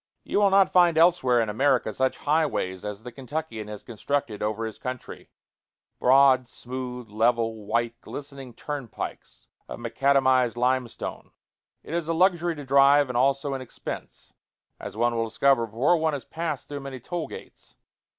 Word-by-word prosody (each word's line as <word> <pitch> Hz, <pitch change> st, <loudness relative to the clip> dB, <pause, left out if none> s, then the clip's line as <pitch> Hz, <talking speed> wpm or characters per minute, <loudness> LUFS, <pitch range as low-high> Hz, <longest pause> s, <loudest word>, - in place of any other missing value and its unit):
You -, -, 0 dB
will 200 Hz, -1 st, +5 dB
not 195 Hz, 0 st, +4 dB
find 175 Hz, -3 st, +5 dB
elsewhere 160 Hz, -8 st, +4 dB
in 115 Hz, -, -1 dB
America 125 Hz, 0 st, +1 dB
such 130 Hz, +4 st, 0 dB
highways 145 Hz, -, 0 dB
as 105 Hz, +1 st, -6 dB
the 125 Hz, -, -8 dB
Kentuckian 135 Hz, -4 st, -5 dB
has 105 Hz, -1 st, -8 dB
constructed 120 Hz, -1 st, -3 dB
over 110 Hz, +1 st, -1 dB
his 110 Hz, -2 st, -7 dB
country 125 Hz, -1 st, -7 dB, 0.7 s
broad, 130 Hz, -1 st, +5 dB
smooth, 125 Hz, -1 st, -7 dB
level, 115 Hz, -1 st, 0 dB
white, 115 Hz, +1 st, -1 dB
glistening 140 Hz, -4 st, -9 dB
turnpikes 145 Hz, -8 st, -7 dB, 0.2 s
of -, -, -6 dB
macadamized 130 Hz, 0 st, +2 dB
limestone. 125 Hz, -1 st, -2 dB, 0.5 s
It -, -, -8 dB
is 170 Hz, -2 st, -1 dB
a 165 Hz, -, 0 dB
luxury 175 Hz, -1 st, +2 dB
to 145 Hz, -2 st, -8 dB
drive, 140 Hz, +1 st, +5 dB
and 125 Hz, -, -4 dB
also 140 Hz, +2 st, +1 dB
an 135 Hz, -, -4 dB
expense, 130 Hz, -, -8 dB, 0.5 s
as -, -, -8 dB
one 120 Hz, +1 st, +2 dB
will 115 Hz, 0 st, 0 dB
discover 120 Hz, +1 st, +2 dB
before 125 Hz, +11 st, +2 dB
one 160 Hz, -1 st, 0 dB
has 140 Hz, -, -5 dB
passed 160 Hz, -5 st, -4 dB
through 145 Hz, -1 st, -5 dB
many 135 Hz, -2 st, -7 dB
toll 165 Hz, +4 st, -4 dB
gates. -, -, -12 dB
130 Hz, 160 wpm, -26 LUFS, 115-145 Hz, 0.7 s, will